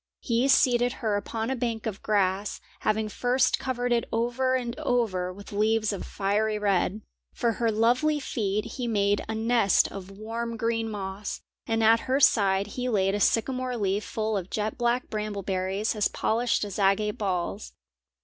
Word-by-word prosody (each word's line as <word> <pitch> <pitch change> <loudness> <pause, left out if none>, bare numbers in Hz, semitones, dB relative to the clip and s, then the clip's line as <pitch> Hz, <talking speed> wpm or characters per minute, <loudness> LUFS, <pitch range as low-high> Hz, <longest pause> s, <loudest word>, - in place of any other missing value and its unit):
He 240 +2 +1
seated 245 -2 +4
her 210 -2 +2
upon 225 +3 -3
a - - 0
bank 230 -3 -3
of 215 -3 -4
grass, 200 -1 0 0.2
having 215 0 0
first 245 +5 +1
covered 245 -1 -2
it 235 -1 +1
over 245 +3 +1
and 240 -2 -2
over 195 -7 0
with 200 +2 -11
leaves 215 +1 +1
of 195 - -5
fiery 210 +2 0
red. 200 0 0 0.3
For 235 - +1
her 230 0 0
lovely 250 +8 +2
feet 210 -6 -2
he 250 -3 -4
made 205 -2 +1
a 220 - -2
nest 225 -2 +3
of 195 -1 -8
warm 230 +3 -5
green 225 0 -1
moss, 200 -1 -5 0.3
and 225 0 +1
at 225 +1 +6
her 265 +2 +3
side 200 -7 +4
he 250 +4 -4
laid 195 -4 +2
a 205 - 0
sycamore 255 +4 +1
leaf 200 0 0
full 220 0 -2
of 185 -1 -5
jet 215 0 -2
black 240 +1 0
bramble 210 -2 -3
berries 190 +3 -1
as 210 -2 +2
polished 235 +1 0
as 200 0 -6
agate 205 +2 +2
balls. 195 0 -2
220 Hz, 170 wpm, -27 LUFS, 200-235 Hz, 0.3 s, at